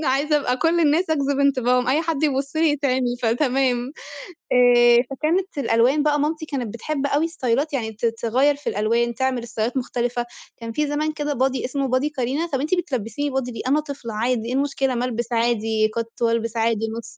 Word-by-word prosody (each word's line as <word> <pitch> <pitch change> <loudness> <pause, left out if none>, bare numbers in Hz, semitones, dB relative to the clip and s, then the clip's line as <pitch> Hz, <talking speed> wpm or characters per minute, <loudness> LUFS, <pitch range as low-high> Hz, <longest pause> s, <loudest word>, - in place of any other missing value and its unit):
أنا 310 - -1
عايزة 285 +3 +2
أبقى 250 -2 0
كل 330 +4 +2
الناس 320 +2 +2
أجذب 280 -2 +1
انتباههم، 250 -3 +2
أي 285 +4 +3
حد 315 -3 -2
يبُص 275 0 0
لي 320 0 +3
يتعمي، 260 -4 0
فتمام 250 +1 +1 0.6
آآ 240 -1 +6
فكانت 325 +7 -1
الألوان 255 +3 +2
بقى 295 -1 +2
مامتي 310 +2 -1
كانت 255 -8 -4
بتحب 280 +4 -3
أوي 290 +3 +1
استايلات 290 -3 -1
يعني 225 -5 -2
ت 220 +2 -4
تغيّر 235 +5 +1
في 290 - -12
الألوان 230 +3 0
تعمل 260 -2 -1
استايلات 235 +2 -3
مختلفة، 240 -1 -2 0.3
كان 230 -1 -6
في 300 +6 -1
زمان 300 +2 -1
كده 295 -1 -2
بادي 260 -1 0
إسمه 275 +1 -2
بادي 255 +4 +1
كارينا 280 +4 -2
طَب 270 -5 -2
أنتِ 310 +5 +1
بتلبسيني 285 - -2
بادي 265 -2 -2
ليه، 230 - -6
أنا 290 +3 +3
طفلة 280 -7 -6
عادي 230 +1 -1
ايه 245 - -3
المشكلة 270 -1 0
ما 245 - -1
البس 240 -1 -3
عادي 225 -2 +1
كَت 230 0 -5
وألبس 230 -1 0
عادي 225 -1 +1
نُص 230 0 -9
260 Hz, 190 wpm, -22 LUFS, 235-290 Hz, 0.6 s, آآ